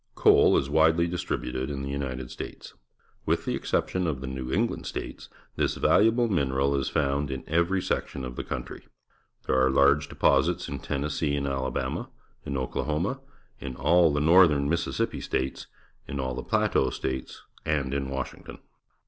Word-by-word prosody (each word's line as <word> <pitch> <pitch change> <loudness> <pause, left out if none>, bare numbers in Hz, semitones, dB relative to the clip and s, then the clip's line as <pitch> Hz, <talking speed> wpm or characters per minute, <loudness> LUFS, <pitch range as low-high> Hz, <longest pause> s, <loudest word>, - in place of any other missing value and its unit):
— - - -42
Coal - - +5
is 65 - 0
wadely 80 +3 +4
distributed 70 -6 -3
in 70 -1 -4
the 70 0 -3
L'nited 65 -3 -4
States. - - -8 0.5
With - - +1
the - - -1
exception 90 -1 -1
of 75 -5 -2
the 65 - -6
New 65 -1 -5
England 115 +7 -1
States, - - -6 0.3
this - - +1
valuable 115 +3 +4
mineral 70 -7 +1
is 70 -1 -1
found 70 -1 0
in 65 0 -4
every 85 +4 +1
section 65 - -2
of 60 -1 -7
the - - -4
country. - - -6 0.6
There 65 0 +2
are 65 - +4
large 70 +2 +3
deposits - - +2
in - - -5
Tennes 70 +2 -3
see 75 -3 +1
and 70 -1 -2
Alabama, 65 -2 -2 0.4
in 70 - -2
Oklahoma, 75 - -2 0.4
in 65 - -6
all 80 +5 +4
the 75 - 0
Northern 80 -3 +5
IMississippi 85 +3 -1
States, 65 +1 -3 0.4
in 70 - -4
all 65 -1 -2
the - - -4
Plateau - - +1
States, 65 -1 -5 0.2
and 70 -3 -1
in 70 -1 -2
Washington. 65 -1 -6
70 Hz, 165 wpm, -27 LUFS, 65-80 Hz, 0.6 s, Coal